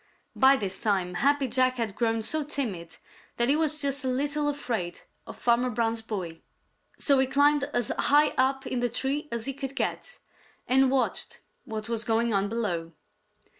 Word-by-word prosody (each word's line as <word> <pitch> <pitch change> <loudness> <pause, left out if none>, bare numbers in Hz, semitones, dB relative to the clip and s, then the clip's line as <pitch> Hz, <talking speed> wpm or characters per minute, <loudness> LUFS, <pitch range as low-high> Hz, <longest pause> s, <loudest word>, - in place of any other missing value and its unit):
By 270 +1 +6
this 195 -4 -4
time 190 -4 0
Happy 280 +7 +2
Jack 255 +1 +2
had 225 -4 -2
grown 225 0 0
so 310 +7 0
timid 220 - -4 0.4
that 235 +1 +2
he 285 - +4
was 310 -1 +1
just 280 -2 -1
a - - -2
little 290 +3 0
afraid 235 -11 -3 0.3
of - - -9
Farmer 245 +1 +2
Brown's 230 -1 -1
boy, 185 -7 -6 0.6
so 280 -2 +3
he 265 - +3
climbed 285 +1 +3
as 245 -6 -1
high 295 +1 +4
up 270 +1 0
in 255 - -2
the 245 0 0
tree 270 +5 -2
as 235 -1 -2
he 275 - -2
could 275 0 -6
get - - -3 0.5
and 265 +1 +4
watched 265 -1 0 0.2
what 220 -3 -5
was 230 -1 -1
going 230 +1 +1
on 200 0 +1
below. 175 -8 -3
250 Hz, 175 wpm, -27 LUFS, 220-275 Hz, 0.6 s, By